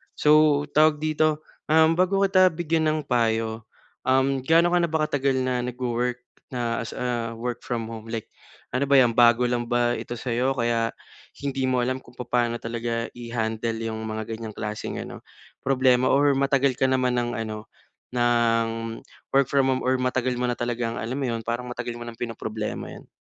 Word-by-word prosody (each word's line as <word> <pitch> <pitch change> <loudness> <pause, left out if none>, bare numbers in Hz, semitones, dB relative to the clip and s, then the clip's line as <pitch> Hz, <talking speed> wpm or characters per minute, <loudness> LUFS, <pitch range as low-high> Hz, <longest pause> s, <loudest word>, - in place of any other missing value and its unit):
So, 150 -1 +4
tawag 155 0 +4
dito, 155 0 +1 0.3
um, 160 +1 +5
bago 190 +2 +2
kita 185 -1 +5
bigyan 160 -1 0
ng 155 - -1
payo, 115 -2 0 0.4
um, 135 +1 +3
gaano 165 +3 +4
ka 180 - +5
na 170 - +2
ba 160 - +1
katagal 140 -2 0
na 130 0 0
nagwo-work 125 0 -2 0.3
na 115 -1 -1
as - - -7
a 120 -2 -2
work-from-home? 115 -1 -5
Like 115 -2 -5 0.4
ano 135 +2 0
ba 140 - +4
yan 120 -2 +5
bago 120 0 +5
lang 120 -1 -1
ba 120 0 +1
ito 120 - -6
sayo 125 +3 -1
kaya 115 -1 0 0.5
hindi 135 -2 -1
mo 130 -1 +1
alam 130 +1 -1
kung 125 - -19
papaano 120 -1 0
talaga 115 0 -3
i-handle 115 -1 -3
yung 110 -1 -3
mga 110 0 -3
ganyang 110 -2 -8
klaseng 105 0 -4
ano, - - -9 0.4
problema, 130 -1 +3
or 145 +1 +4
matagal 135 -1 +2
ka 130 - +3
naman 130 -1 +1
ng 120 0 -1
ano 110 -1 -5 0.5
ng 120 -1 +2 0.7
work-from-home, 135 -1 +2
or 130 0 +1
matagal 125 0 0
mo 125 - 0
na 120 - 0
talagang 120 -1 -2
alam 115 +4 -3
mo 135 - -1
yun 115 -1 -3
parang 120 +2 -3
matagal 120 -1 -4
mo 120 - -7
ng 115 - -7
pinoproblema 110 -2 -4
yan? - - -13
125 Hz, 170 wpm, -25 LUFS, 115-135 Hz, 0.7 s, um